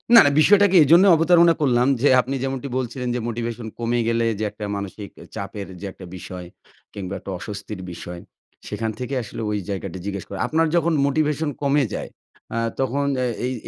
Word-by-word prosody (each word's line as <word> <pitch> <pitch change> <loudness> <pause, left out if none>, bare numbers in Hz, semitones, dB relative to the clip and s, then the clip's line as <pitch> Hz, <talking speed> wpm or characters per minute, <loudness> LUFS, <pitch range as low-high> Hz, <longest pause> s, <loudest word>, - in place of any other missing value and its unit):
না, - - +12
না। - - +5
বিষয়টাকে 200 +2 +5
এইজন্যে 170 +7 +6
অবতারণা 170 +1 +5
করলাম 125 -2 +3
যে, 145 - +4
আপনি 135 +2 -4
যেমনটি 135 0 -3
বলছিলেন 125 0 -3
যে - - -1
মোটিভেশন 115 0 -4
কমে 120 +1 0
গেলে 115 0 +1
যে - - -1
একটা 105 - -7
মানসিক 100 0 -6
এ - - -11
চাপের 100 0 -6
যে 100 - -7
একটা 95 - -12
বিষয় 90 0 -8 0.5
কিংবা 95 -1 -5
একটা 100 - -7
অস্বস্তির 105 0 -7
বিষয়, 85 0 -8 0.5
সেখান 110 -1 -2
থেকে 125 +2 -4
আসলে 110 - -7
ঐ - - -1 0.2
জায়গাটি 95 -2 -4
জিজ্ঞেস 100 -2 -4
করা। 100 -1 -6
আপনার 160 +1 +2
যখন 170 -1 +2
মোটিভেশন 150 +1 0
কমে 140 0 +3
যায় - - -5 0.5
আ - - -1 0.2
তখন 135 +2 0
অ্যা 125 -1 0 0.2
এই 130 - -1
120 Hz, 185 wpm, -22 LUFS, 100-145 Hz, 0.5 s, না